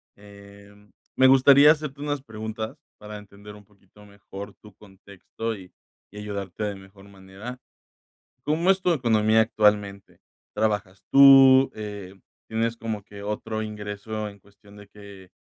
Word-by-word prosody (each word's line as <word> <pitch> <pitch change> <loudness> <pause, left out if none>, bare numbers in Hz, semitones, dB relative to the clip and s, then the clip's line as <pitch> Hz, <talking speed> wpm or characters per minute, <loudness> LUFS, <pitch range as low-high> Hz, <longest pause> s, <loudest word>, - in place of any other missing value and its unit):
Em, 100 0 -17 0.2
me 130 - +4
gustaría 135 +3 +7
hacerte 150 -3 -4
unas 145 -2 -3
preguntas 110 -2 -7 0.2
para 105 0 -9
entender 105 0 -14
un 105 -1 -17
poquito 105 0 -22
mejor 100 0 -11
tu 105 -2 -18
contexto, 100 +3 -8
y 95 -2 -14 0.4
y 105 - -10
ayudarte 100 -1 -6
de 105 -1 -3
mejor 95 0 -16
manera. 100 +6 -11 0.8
¿Cómo 165 +5 +1
es 190 0 +2
tu 180 -1 +1
economía 110 -4 +2
actualmente? 105 -3 -1 0.3
¿Trabajas 105 -3 -2
tú? 135 -1 +7
Eh, 105 -3 -8 0.3
¿tienes 115 +1 -2
como 110 -3 -5
que 100 -1 -12
otro 110 +1 -4
ingreso 105 0 -6
en 100 - -17
cuestión 100 +1 -21
de 100 -1 -15
que, 100 -3 -15
105 Hz, 140 wpm, -24 LUFS, 100-115 Hz, 0.8 s, gustaría